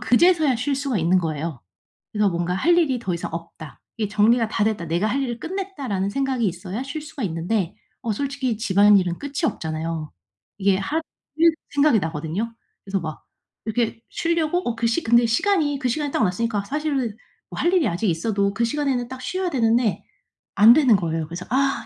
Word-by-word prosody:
그제서야 300 +1 +4
쉴 275 +4 -1
수가 270 -4 -1
있는 175 +3 +3
거예요. 160 -5 -3 0.5
그래서 210 -1 +2
뭔가 175 +1 -1
'할 335 - +3
일이 275 -7 +2
더 190 -6 -2
이상 170 - -4
없다. 165 -2 -9 0.2
이게 215 -2 -1
정리가 220 +3 +3
다 210 0 0
됐다. 210 -5 -1
내가 170 +6 0
할 270 +6 0
일을 240 -3 -3
끝냈다.'라는 285 - -3
생각이 265 -1 0
있어야 185 +5 -4
쉴 280 +3 -5
수가 300 -2 -8
있는데 175 +2 -1 0.3
어 225 - -1
솔직히 265 -1 -2
집안일은 200 -4 +4
끝이 285 +3 -4
없잖아요. 160 - -3 0.5
이게 195 -1 +3
할 295 +12 -1 0.4
일 335 0 +6 0.2
생각이 285 -4 +4
나거든요? 165 +8 -3 0.3
그래서 195 -1 -2
막 155 -2 -7 0.4
이렇게 225 0 -1
쉬려고 335 0 0
어 240 - 0
그 230 +1 0
시 235 +9 0
근데 235 +1 +5
시간이 290 - +1
그 255 - 0
시간이 290 +4 -1
딱 - - +1
왔으니까 205 +2 0
사실 300 +6 -2 0.6
뭐 - - -7
할 345 - +2
일이 360 -7 +3
아직 190 +4 -1
있어도 200 +4 0
그 235 - +1
시간에는 255 -1 -1
딱 260 0 -8
쉬어야 370 +3 -2
되는데 230 - +1 0.5
안 215 +4 +8
되는 260 -5 +5
거예요. 165 -4 -1
그래서 170 +3 -7
"아 270 +3 +1
225 Hz, 385 characters per minute, -23 LUFS, 185-275 Hz, 0.6 s, 안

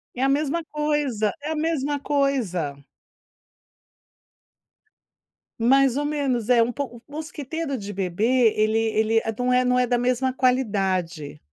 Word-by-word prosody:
É 250 - -4
a - - +4
mesma 295 +4 0
coisa, 295 -9 -1
é 300 +2 -4
a - - -1
mesma 300 -2 -1
coisa. 250 - -1 2.8
Mais 265 +2 +4
ou 290 - -1
menos. 270 -6 -1
É 240 -2 +5
pou 245 -2 -5
o - - -21
mosquiteiro 310 -1 -5
de 205 -2 -7
bebê, 215 +6 +2
ele 215 +1 +2
ele 225 0 +1
é 225 - -2
não 250 0 +1
é 250 0 +3
não 250 0 +2
é 250 - +3
da 245 0 +2
mesma 255 +1 0
qualidade. 190 - 0
250 Hz, 140 wpm, -24 LUFS, 220-285 Hz, 2.8 s, É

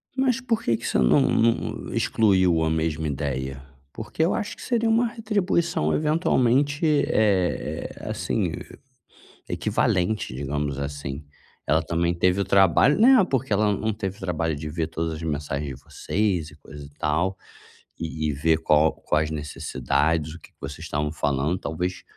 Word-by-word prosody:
Mas 260 -1 +1
porque 225 - 0
que - - -9
você - - 0
não 60 -1 +4
não 115 0 0
excluiu 95 -6 +3
a 80 - +1
mesma 80 -1 -1
ideia? 70 -2 -3 0.3
Porque 115 +8 -3
eu 170 - +2
acho 205 - -3
que - - -14
seria 230 -2 0
uma 230 +2 +3
retribuição 200 - 0
eventualmente, 145 -1 +2
eh 105 - +1
eh, - - -7
assim, - - -1 1.0
e - - -7
equivalente, 90 - 0
digamos 70 +1 -3
assim. 70 0 -5 0.4
Ela 80 +1 +2
também 85 +1 0
teve 90 +3 +2
o - - +1
trabalho 95 - +4
não, 245 -3 +7
porque 135 - -2
ela 105 +1 +3
não 110 0 -1
teve 100 -2 -4
o - - -17
trabalho 80 -4 -1
de 75 +1 -6
ver 80 +1 -2
todas 80 0 -3
as 75 - -8
mensagens 75 -3 -3
de - - -24
vocês 95 -6 -2
e 75 - -16
coisa 75 0 -11
e 70 - -12
tal, 85 +6 0 0.6
e 80 -1 -3
e - - 0
ver 80 +3 +2
qual 80 0 +3
quais 75 0 -1
necessidades, 75 +1 -1
o - - -11
que - - -17
que - - -46
vocês 70 +2 -7
estavam 75 0 -2
falando. 75 +2 0
Talvez, 90 +3 -4
85 Hz, 165 wpm, -24 LUFS, 75-110 Hz, 1.0 s, não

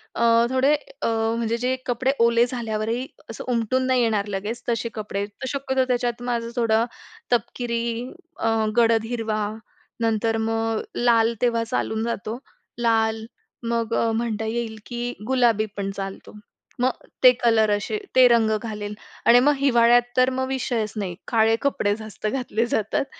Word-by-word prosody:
अ, - - -3 0.3
थोडे 260 +3 +3 0.3
अ, - - +1 0.3
म्हणजे 230 0 -1
जे 250 +2 0
कपडे 255 +2 +1
ओले 235 +1 +4
झाल्यावरही 235 0 -3 0.2
असं 225 - -7
उमटून 245 +2 +1
नाही 255 -1 +3
येणार 215 -3 +1
लगेच. 205 +4 -4
तसे 230 0 -1
कपडे 205 -2 -3
तर 205 +5 -9
शक्यतो 265 -2 0
त्याच्यात 245 -1 -1
माझं 235 -1 -2
थोडं 230 -1 +2 0.5
तपकिरी 235 +1 -1 0.3
अ, 225 - 0 0.3
गडद 225 -1 +4
हिरवा 220 -3 -1 0.6
नंतर 225 0 +1
मग 225 0 -1
लाल 235 -1 +3
तेव्हा 235 -2 +2
चालून 220 -1 -2
जातो. 230 0 -3 0.4
लाल 225 -1 +1 0.4
मग 230 -1 -1
अ, 230 -1 +1
म्हणता 225 -1 -2
येईल 225 0 -3
की 240 0 -4
गुलाबी 240 -4 +3
पण 200 -1 -2
चालतो. 195 0 -7 0.5
मग 255 +1 +3 0.3
ते 250 - +10
कलर 220 -2 +4
असे 205 - -3 0.2
ते 255 -1 +8
रंग 230 -2 +3
घालेल 210 -2 -5 0.3
आणि 240 +1 +7
मग 290 +4 +4
हिवाळ्यात 240 -3 +5 0.2
तर 255 +1 +5
मग 260 0 -2
विषयचं 230 -5 -2
नाही 185 -3 -3
काळे 225 -1 +3
कपडे 205 -7 +1
जास्त 215 -1 -6
घातले 235 -1 -1
जातात. 220 +4 0
230 Hz, 150 wpm, -23 LUFS, 220-245 Hz, 0.6 s, ते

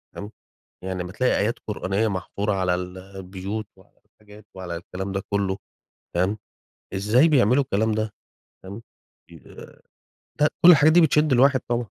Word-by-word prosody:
تمام، 105 +2 -8 0.5
يعني 95 -1 -4
أما 90 - -8
تلاقي 125 +6 +1
آيات 110 +3 0
قرآنية 105 +1 -1
محفورة 100 +2 -3
على 95 -2 0
ال 90 +1 -6
البيوت 95 +2 -7
وعلى - - -24
الحاجات 105 0 -18
وعلى 90 -2 -6
الكلام 95 +2 -6
ده 95 0 -2
كله 100 -1 -1 0.6
تمام، 95 +5 0 0.6
إزاي 110 +10 +3
بيعملوا 130 -2 +4
الكلام 110 -2 0
ده 110 -1 -2 0.5
تمام، 100 +4 -9 0.5
فاهمني؟ - - -16
آآ، - - -15 0.6
ده 150 - +5 0.2
كل 180 - +11
الحاجات 155 -1 +6
دي 175 - +6
بتشد 150 -2 +3
الواحد 130 +1 +4
طبعًا. 120 -1 -1
105 Hz, 155 wpm, -23 LUFS, 95-120 Hz, 0.6 s, كل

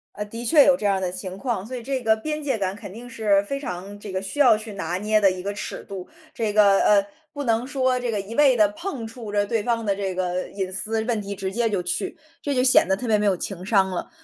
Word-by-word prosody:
呃， 210 - -4
的 230 +3 -7
确 290 +3 +6
有 275 - +6
这 215 - -5
样 200 -1 +3
儿 - - -4
的 180 -1 -1
情 185 0 -6
况， 220 -4 -2
所 255 +3 -6
以 240 - -6
这 265 +1 -2
个 220 -2 +3
边 300 +7 -4
界 270 -5 0
感 190 -2 -2
肯 205 -2 -9
定 235 +5 -10
是 210 -4 +2
非 275 +7 -4
常 195 -5 -6
这 205 -1 -8
个 190 0 -2
需 195 +9 -6
要 245 -6 +6
去 215 0 -8
拿 180 -2 -3
捏 215 +2 +2
的 195 - +6
一 185 0 -6
个 200 +1 -2
尺 205 - -6
度。 190 -2 -7 0.3
这 225 -5 -1
个， 200 -2 +5
呃 200 -1 +4 0.3
不 285 -1 -5
能 230 -1 +1
说 260 -2 +1
这 245 -1 -3
个 210 - -1
一 200 +3 -7
味 275 -3 +5
地 210 -2 +6
碰 315 -10 -5
触 225 -2 -8
着 205 0 +1
对 225 +1 0
方 230 0 -1
的 200 -1 +1
这 195 -2 -3
个 180 0 -2
隐 190 -2 -3
私 220 +3 -2
问 230 -3 0
题 200 0 -5
直 190 -1 -4
接 235 +1 +1
就 200 -4 0
去， 345 - -3 0.2
这 285 - -1
就 250 - +3
显 255 -7 +5
得 190 - +1
特 250 - -5
别 215 -1 +4
没 210 - 0
有 195 -3 +2
情 185 -1 -5
商 195 -2 +3
了。 180 - -4
210 Hz, 305 characters per minute, -24 LUFS, 195-245 Hz, 0.3 s, 确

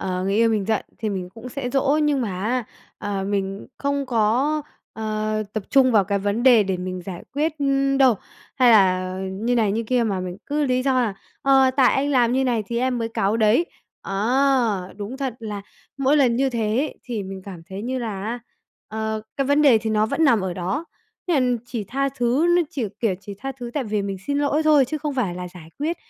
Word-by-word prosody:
ờ, 185 -1 -2
người 195 +1 0
yêu 230 +1 +4
mình 215 -3 0
giận 220 +1 0
thì 220 - -2
mình 185 -3 -3
cũng 230 +2 -9
sẽ 250 -1 -4
dỗ. 280 +3 +2
Nhưng 290 -3 +2
mà 230 - -1
á, 245 +2 0 0.3
ờ, 195 -1 -3
mình 195 0 -2
không 280 -1 -1
có, 250 +6 +1 0.3
ờ, 215 0 -2
tập 215 - -2
trung 260 -3 +5
vào 205 -3 +5
cái 200 +1 0
vấn 205 +4 -1
đề 245 -5 +7
để 190 -2 -1
mình 185 0 -5
giải 180 -1 -7
quyết 300 +2 +1 0.5
đâu, 260 -4 +6 0.4
hay 250 -2 +5
là 185 -3 +4 0.2
như 225 +6 -1
này, 215 -4 +2
như 225 - -1
kia 245 +1 +1
mà 195 -4 -1
mình 180 0 -5
cứ 295 0 0
lý 255 -1 +1
do 260 -1 +2
là 220 -5 0 0.3
"Ờ, 270 -1 +5
tại 260 -2 +5
anh 280 +2 +1
làm 245 -3 +3
như 265 +1 +2
này 235 -4 +1
thì 235 0 -2
em 255 -1 0
mới 230 0 -2
cáu 210 -1 0
đấy". 225 +10 +3 0.4
Ờ, 225 -2 +1
đúng 215 +5 -6
thật 265 -4 -3
là 210 -3 -6 0.4
mỗi 275 +2 +3
lần 245 -5 +3
như 270 +1 +2
thế 225 -2 -1
ấy 290 +4 -1
thì 230 -5 -4
mình 190 0 -7
cảm 180 -4 -9
thấy 195 +2 -6
như 255 +3 -2
là 210 -5 -4
á, 230 +3 -3 0.5
ờ, 220 0 -3
cái 275 -1 0
vấn 285 +2 +3
đề 255 -6 +6
thì 220 0 -3
nó 215 0 +2
vẫn 325 +7 +1
nằm 235 -7 +4
ở 185 -2 -3
đó. 190 - -2 0.4
Nên 265 -7 +3
là - - +1
chỉ 225 -5 -4
tha 275 +6 -1
thứ, 265 +4 +1
nó 350 - +4
chỉ, 255 -5 -2 0.2
kiểu, 215 -6 +1
chỉ 200 0 -8
tha 270 +4 -4
thứ, 245 -2 -8
tại 280 -4 -1
vì 210 -1 -1
mình 195 -1 -3
xin 285 0 0
lỗi 290 +2 +1
thôi 300 -3 +5
chứ 305 +5 -4
không 295 -1 -3
phải 205 -9 -1
là 180 0 -6
giải 175 -3 -13
quyết, 320 +4 -1
230 Hz, 230 wpm, -23 LUFS, 205-270 Hz, 0.5 s, đề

